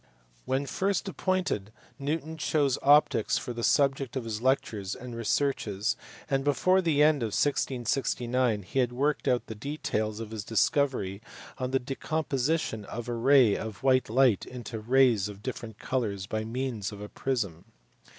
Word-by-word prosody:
When 135 +2 0
first 195 +6 -1
appointed 185 - -1 0.3
Newton 155 +3 -2
chose 145 -3 +1
optics 145 -6 +4
for 120 - -4
the 120 - -5
subject 135 -2 +2
of 130 - -2
his 110 -1 -4
lectures 110 -7 0
and 125 -1 -8
researches, 110 -2 0 0.3
and 135 -1 0
before 185 +6 +3
the 155 -4 +3
end 150 -3 +4
of 110 -3 -1
1669 125 -4 0
he 135 - -2
had 125 -2 +2
worked 140 +3 0
out 125 -2 +2
the 110 - -6
details 110 -3 -3
of 110 -1 -6
his 110 -3 -4
discovery 115 -4 +1 0.4
of 130 0 -2
the 135 - +2
decompo 140 +3 -3
sition 130 -6 0
of 120 +3 -6
a 120 - -2
ray 125 -2 +5
of 110 0 -6
white 130 -3 +3
light 125 -3 +4
into 120 -2 -7
rays 120 -3 +3
of 100 0 -11
different 115 -4 -6
colours 105 -7 -2
by 110 +2 -3
means 115 -3 -3
of 105 - -9
a 105 - -6
prism. 100 -10 -3
125 Hz, 160 wpm, -28 LUFS, 110-140 Hz, 0.4 s, ray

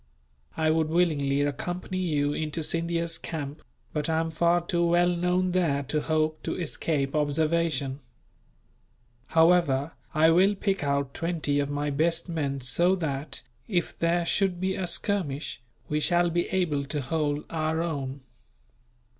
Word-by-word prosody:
I 155 -1 +2
would 160 -1 +1
willingly 150 -5 +2
accompany 175 +5 -3
you 145 -5 0
into 155 +1 -3
Scindia's 165 +1 -1
camp, 145 -2 -5 0.3
but 150 +1 -1
I 160 0 +2
am 165 0 -1
far 170 +1 +2
too 170 -1 +1
well 175 +1 +4
known 180 +1 +1
there 160 -6 +1
to 150 +3 -1
hope 155 0 0
to - - -3
escape 150 -4 -1
observation. 150 -2 +1 1.3
However, 160 -4 +3 0.2
I 160 +1 +5
will 190 +5 +4
pick 195 -3 -1
out 140 -1 0
twenty 165 -4 -1
of 140 0 -1
my 145 0 -1
best 165 +4 +1
men 145 -5 -2
so 170 +10 +2
that, 150 -4 -4 0.2
if 175 -6 -1
there 170 +1 +2
should 185 0 +1
be 190 +1 0
a 185 -1 -2
skirmish, 160 - -1 0.3
we 150 - 0
shall 175 +2 +2
be 175 +1 0
able 165 -7 0
to 145 +1 -3
hold 150 +1 -1
our 160 0 0
own. 140 -4 -4
160 Hz, 145 wpm, -27 LUFS, 145-175 Hz, 1.3 s, I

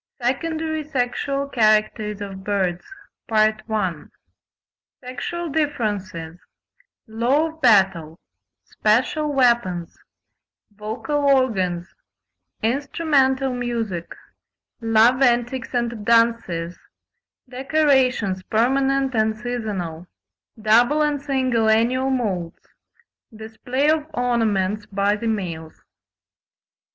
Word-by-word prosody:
SECONDARY 315 +5 -2
SEXUAL 275 0 -2
CHARACTERS 215 -3 +1
OF 195 -1 -7
BIRDS. 190 -3 -1 2.2
Sexual 265 +7 -5
differences—Law 220 - -3
of 320 0 -16
battle—Special 190 - 0
weapons—Vocal 225 - -3
organs—Instrumental 250 - -1
music—Love 230 +1 -2
antics 245 +1 +1
and 235 -3 -2
dances—Decorations, 235 - 0
permanent 270 +5 +1
and 220 -1 +1
seasonal—Double 220 - -1
and 295 -2 0
single 260 -5 +1
annual 245 +4 +2
moults—Display 225 - -4
of 310 -1 -1
ornaments 215 -4 0
by 200 +1 +1
the 230 +2 -4
males. 170 -7 -4
230 Hz, 60 wpm, -22 LUFS, 200-265 Hz, 2.2 s, annual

